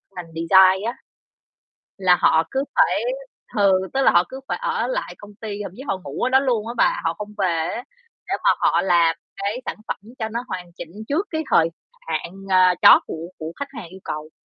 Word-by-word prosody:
ngành 165 -2 -8
design 190 +4 +5
á, 235 - -1 1.1
là 180 -2 +4
họ 160 - +4
cứ 270 +1 -1
phải - - +3 0.5
ừ, 200 -2 +4 0.2
tức 270 - +2
là - - +6
họ 175 - +5
cứ 265 - -8
phải - - -2
ở - - 0
lại - - -3
công 205 0 -13
ty, 210 -2 -6
thậm 180 - -7
chí 265 - -8
họ 190 - -1
ngủ 140 0 -5
ở 250 - +3
đó 265 - +5
luôn 235 -5 0
á 235 - -5
bà, - - +2
họ 165 0 0
không 210 +3 -8
về 190 - +2 0.3
á, 245 - -6 0.4
để - - 0
mà - - +6
họ - - +2
làm 170 -3 +3 0.2
cái 200 +5 -3
sản - - -3
phẩm - - -3 0.2
cho 220 - -2
nó 235 +2 -4
hoàn 180 -2 -6
chỉnh 170 -1 -9 0.2
trước 330 +8 0
cái 315 -1 -2
thời 165 -3 +4 0.4
hạn, 170 - -3 0.2
ờ, 185 -1 +5
chót - - +9
của 165 +1 -6
của 160 +1 -6
khách 280 0 -5
hàng 225 -10 -8
yêu 190 +2 -13
cầu. 155 +1 -5
195 Hz, 220 wpm, -22 LUFS, 170-235 Hz, 1.1 s, chót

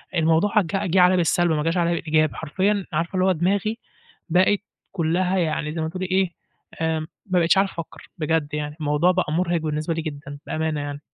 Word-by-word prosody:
الموضوع 165 +6 +3
ج 185 - -4 0.3
جِه 190 - +4
عليَّ 180 +1 +5
بالسَلب، 175 0 +2
ما 150 -1 0
جاش 165 +3 0
عليَّ 170 -1 +2
بالإيجاب، 155 -2 +1
حرفيًا 195 +5 0
عارفة 170 +4 -1
اللي 185 0 +2
هو 190 - +4
دماغي 200 +6 0 0.5
بقِت 185 +4 +3 0.3
كُلّها 180 +2 0
يعني 155 -3 -1
زي 160 - -3
ما 160 - -1
تقولي 185 +2 -4
إيه، 185 -1 +1 0.5
آمم، 160 -1 -1 0.2
ما 185 -3 +1
بقيتش 170 +3 +3
عارف 195 0 +3
أفكّر، 165 -2 -9
بجد 155 -2 -1
يعني 150 0 -3
الموضوع 150 +4 +2
بقى 180 -4 -1
مُرهِق 175 +1 +1
بالنسبة 155 +1 -2
لي 165 - -2
جدًا، 145 -2 -7
بأمانة 155 -2 -1
يعني. 145 0 -5
165 Hz, 195 wpm, -23 LUFS, 155-185 Hz, 0.5 s, عليَّ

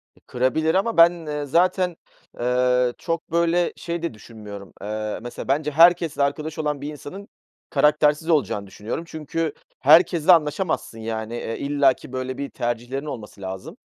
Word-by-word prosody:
E, - - -23
kırabilir 145 +7 0
ama 200 +3 +1
ben 165 -4 +3
zaten, 180 +3 +2 0.4
eee, 125 0 +2
çok 165 -1 -4
böyle 170 +1 +2
şey 170 0 -4
de 170 - -2
düşünmüyorum, 105 -3 -11
eee, 105 +1 -4
mesela 120 0 -7
bence 150 +3 0
herkesle 165 -2 +5
arkadaş 150 +3 -2
olan 150 -2 -2
bir 145 +1 -4
insanın 190 +7 -9 0.4
karaktersiz 150 +2 +3
olacağını 115 -10 +1
düşünüyorum. 105 - -5
Çünkü 160 0 -3 0.3
herkesle 165 +3 +6
anlaşamazsın, 155 - +1
yani. 110 +1 -4
E, 115 -1 -4
illaki 140 -3 +1
böyle 130 0 -4
bir 140 -1 -4
tercihlerin 120 +4 -3
olması 110 -8 -8
lazım. 95 0 -7
145 Hz, 140 wpm, -23 LUFS, 120-165 Hz, 0.4 s, herkesle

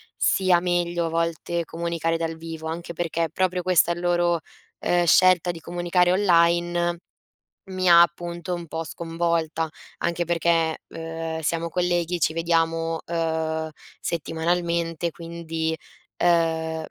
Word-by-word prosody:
sia 185 -2 +3
meglio 175 -1 0
a - - -3
volte 165 +1 -1
comunicare 165 0 -2
dal 165 0 -3
vivo, 160 -1 -7
anche 170 +1 -5
perché 165 0 -1
proprio 185 -1 0
questa 175 -2 +3
è - - 0
il 175 - -7
loro, 175 -1 +2 0.4
ehm, 175 0 +2
scelta 180 +1 +5
di 170 - -9
comunicare 175 +1 +1
online, 175 -2 +2 0.7
mi 185 -1 0
ha 170 0 +9
appunto 175 +1 -2
un 175 -1 -6
po' 165 +1 -4
sconvolta. 165 -1 -1 0.3
Anche 170 0 -1
perché, 165 -1 +1
uhm, 165 0 -5
siamo 165 +1 -1
colleghi 175 0 0
ci - - +2
vediamo, 165 0 0
uhm, 160 -1 -1 0.3
settimanalmente 170 +1 -1
quindi, 165 -1 -4 0.4
ehm, 160 -2 +1
170 Hz, 130 wpm, -24 LUFS, 165-175 Hz, 0.7 s, ha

